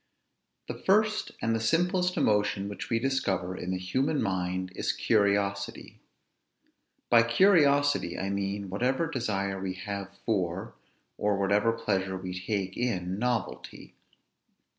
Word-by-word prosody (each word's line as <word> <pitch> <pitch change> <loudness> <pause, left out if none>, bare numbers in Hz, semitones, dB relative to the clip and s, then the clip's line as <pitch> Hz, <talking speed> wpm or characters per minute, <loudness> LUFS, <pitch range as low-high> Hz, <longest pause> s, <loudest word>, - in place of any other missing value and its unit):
The - - -3
first 215 +2 +2
and 115 0 +1
the - - 0
simplest 180 +8 +1
emotion 105 -1 +1
which 100 - -6
we 115 - +2
discover 100 -8 -1
in 90 - -5
the 95 - -1
human 130 +12 0
mind 95 -2 -1
is - - -1
curiosity. 100 -2 0 1.1
By 120 -1 +8
curiosity 145 - +3
I 95 +1 -2
mean 100 0 -3
whatever 130 - +1
desire 100 -10 -2
we 95 -1 -3
have 100 +1 -5 0.2
for, 95 0 -1 0.5
or 105 -1 +1
whatever 100 +3 +2
pleasure 95 -5 -1
we 90 0 -6
take 95 -1 -2
in, 95 -6 -2
novelty. 120 -4 -3
100 Hz, 125 wpm, -28 LUFS, 95-125 Hz, 1.1 s, By